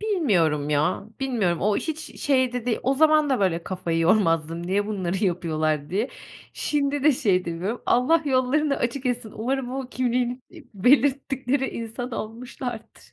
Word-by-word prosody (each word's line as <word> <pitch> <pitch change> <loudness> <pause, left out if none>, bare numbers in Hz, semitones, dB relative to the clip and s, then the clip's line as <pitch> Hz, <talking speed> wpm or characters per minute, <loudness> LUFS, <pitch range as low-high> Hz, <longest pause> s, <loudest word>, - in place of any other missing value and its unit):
Bilmiyorum 180 - +1
ya, 150 +7 +1 0.2
bilmiyorum. 220 -11 0
O 205 +2 +2
hiç 320 0 -5
şey 260 -3 +2
de 250 -1 -4
değil. 235 - +1
O 270 - +2
zaman 305 0 +4
da 260 - +1
böyle 175 -3 +1
kafayı 180 -3 -2
yormazdım, 165 -2 +2
"Niye 200 +3 0
bunları 190 -2 -2
yapıyorlar?" 155 -4 -1
diye. 210 +8 0 0.4
Şimdi 285 -1 -1
de 300 +1 +6
şey 230 -9 +2
edemiyorum, 180 +6 -3
Allah 305 +7 +3
yollarını 275 +2 +1
açık 250 +2 -2
etsin, 245 -3 -2
umarım 250 +3 -2
o 265 -1 -4
kimliğini, 250 0 -1
iiii - - -15
belirttikleri 270 +3 +2
insan 230 +2 -5
olmuşlardır. 235 +1 -7
240 Hz, 150 wpm, -24 LUFS, 185-270 Hz, 0.4 s, de